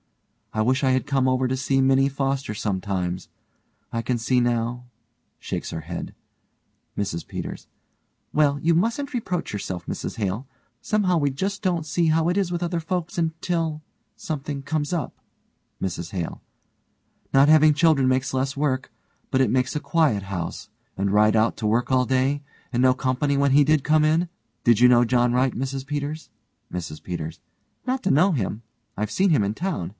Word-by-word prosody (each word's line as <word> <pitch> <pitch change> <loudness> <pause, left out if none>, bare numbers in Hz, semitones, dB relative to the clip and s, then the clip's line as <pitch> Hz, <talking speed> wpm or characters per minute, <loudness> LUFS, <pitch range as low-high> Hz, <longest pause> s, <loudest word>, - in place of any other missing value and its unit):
I 110 - +1
wish 130 +4 +1
I 135 - +4
had 130 +2 +1
come 135 -2 +2
over 130 0 +1
to 130 - 0
see 135 +1 0
Minnie 135 +1 +4
Foster 135 -3 -2
sometimes. 95 -3 -2 0.6
I 115 - 0
can 120 +2 -1
see 125 +2 +2
now 120 +1 -1 0.5
(shakes - - -4
her 80 - -5
head) 85 +2 -6 0.8
MRS 90 -5 -2
PETERS: - - -6 0.7
Well, 145 -2 +3
you 165 +2 +2
mustn't 235 - 0
reproach 185 - -2
yourself, 95 -4 -4
Mrs - - -5
Hale. 105 +5 -2 0.3
Somehow 195 -5 +1
we 145 -1 +2
just 195 +9 -3
don't 175 -5 0
see 165 +2 +1
how 160 +1 +3
it 175 - +1
is 195 -3 0
with 175 0 -2
other 170 -1 -1
folks 175 +1 -3
until 165 -1 -1 0.4
something 145 -2 -4
comes 145 +2 -2
up. 165 -7 -2 0.7
MRS 85 -3 -3
HALE: 85 -4 -4 0.9
Not 135 +1 +6
having 155 0 +6
children 150 -3 +3
makes 130 0 0
less 135 +2 -1
work 135 -2 -1 0.4
but 130 - +1
it 130 -5 +3
makes 130 +3 +1
a - - +1
quiet 150 - +1
house, 90 -3 -5 0.3
and 100 0 0
Wright 105 +1 +4
out 110 +1 +3
to 110 -1 -1
work 120 +4 +1
all 130 -1 +3
day, 130 +3 +1 0.3
and 120 - +2
no 130 0 +5
company 130 +2 0
when 140 0 +3
he 145 +2 +6
did 150 -1 +3
come 155 0 +4
in. 160 +3 +2 0.4
Did 120 -3 +5
you 125 - +8
know 120 0 +5
John 120 0 +2
Wright, 125 +1 +2
Mrs 135 +1 -3
Peters? 145 +2 -4 0.4
MRS 80 -4 -5
PETERS: 80 -3 -5 0.5
Not 260 0 -1
to 190 - +2
know 160 +8 +4
him; 110 -3 -2 0.3
I've 105 +1 -2
seen 190 - +2
him 145 -11 +3
in 100 +1 -1
town. 155 - -3
135 Hz, 180 wpm, -24 LUFS, 115-155 Hz, 0.9 s, you